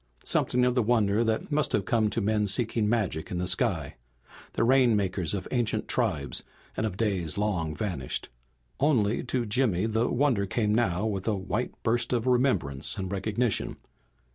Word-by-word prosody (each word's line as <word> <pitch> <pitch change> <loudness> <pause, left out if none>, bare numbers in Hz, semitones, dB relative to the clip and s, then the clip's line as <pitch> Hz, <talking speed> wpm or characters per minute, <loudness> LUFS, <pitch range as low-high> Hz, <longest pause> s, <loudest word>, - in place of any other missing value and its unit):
Something 125 0 +2
of 125 - +2
the 125 - +2
wonder 110 -1 +2
that 110 +6 -1
must 150 0 +1
have 100 - +1
come 110 -1 +2
to 115 - -1
men 105 0 +1
seeking 105 +1 0
magic 100 -9 -1
in 90 - -3
the 90 - -1
sky, 90 -7 -1 0.6
the - - +1
rainmakers 105 - +2
of 95 - -5
ancient 120 -3 0
tribes - - 0 0.3
and 110 - 0
of 95 -3 -6
days 95 -8 -1
long 90 -7 -1
vanished. 85 - -3 0.5
Only 120 -7 +2
to 125 -1 -1
Jimmy 105 -4 +1
the 110 +1 +1
wonder 120 -7 +1
came 105 +1 0
now 105 -4 +1
with 100 -2 -3
a 110 - +2
white 95 -1 -3
burst 120 +2 +1
of 120 -1 0
remembrance 125 - +1
and 95 -2 -4
recognition. 105 +3 -1
105 Hz, 165 wpm, -27 LUFS, 95-120 Hz, 0.6 s, Something